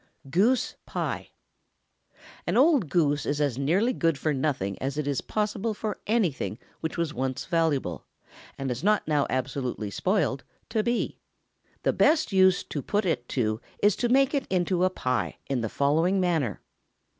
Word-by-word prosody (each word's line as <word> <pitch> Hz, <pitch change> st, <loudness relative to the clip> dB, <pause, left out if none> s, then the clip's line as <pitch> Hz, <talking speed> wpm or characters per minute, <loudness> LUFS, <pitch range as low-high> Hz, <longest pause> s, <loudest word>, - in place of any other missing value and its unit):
GOOSE 225 Hz, -, +2 dB
PIE. -, -, -3 dB, 1.2 s
An -, -, +1 dB
old 270 Hz, -, +4 dB
goose 145 Hz, -4 st, +2 dB
is 145 Hz, 0 st, 0 dB
as 140 Hz, -4 st, 0 dB
nearly 190 Hz, -, +2 dB
good 165 Hz, -, +1 dB
for 150 Hz, +3 st, 0 dB
nothing 130 Hz, -9 st, -1 dB
as 135 Hz, +2 st, -2 dB
it 150 Hz, -, -1 dB
is 140 Hz, -2 st, 0 dB
possible 215 Hz, +1 st, -2 dB
for 210 Hz, -1 st, -4 dB
anything 190 Hz, -, 0 dB, 0.2 s
which 160 Hz, +1 st, -4 dB
was 170 Hz, -3 st, -1 dB
once 130 Hz, +1 st, -2 dB
valuable, 145 Hz, -, 0 dB, 0.5 s
and 135 Hz, -1 st, -2 dB
is 125 Hz, +5 st, -4 dB
not 210 Hz, -3 st, +2 dB
now 150 Hz, -2 st, +2 dB
absolutely 130 Hz, -5 st, -2 dB
spoiled, 180 Hz, -, 0 dB, 0.3 s
to 220 Hz, -, +1 dB
be. 240 Hz, +2 st, -1 dB, 0.6 s
The -, -, +2 dB
best 310 Hz, -4 st, +3 dB
use 190 Hz, -1 st, +5 dB
to 145 Hz, -, -5 dB
put 205 Hz, +8 st, 0 dB
it 125 Hz, -9 st, -1 dB
to 110 Hz, -2 st, 0 dB, 0.2 s
is 205 Hz, -1 st, +5 dB
to 240 Hz, -, 0 dB
make 270 Hz, +2 st, +4 dB
it 275 Hz, -2 st, 0 dB
into 180 Hz, -1 st, +1 dB
a -, -, +3 dB
pie, 125 Hz, -8 st, -2 dB
in 135 Hz, -3 st, -1 dB
the 110 Hz, -, -2 dB
following 160 Hz, -, +2 dB
manner. 165 Hz, -, 0 dB
165 Hz, 165 wpm, -27 LUFS, 135-205 Hz, 1.2 s, use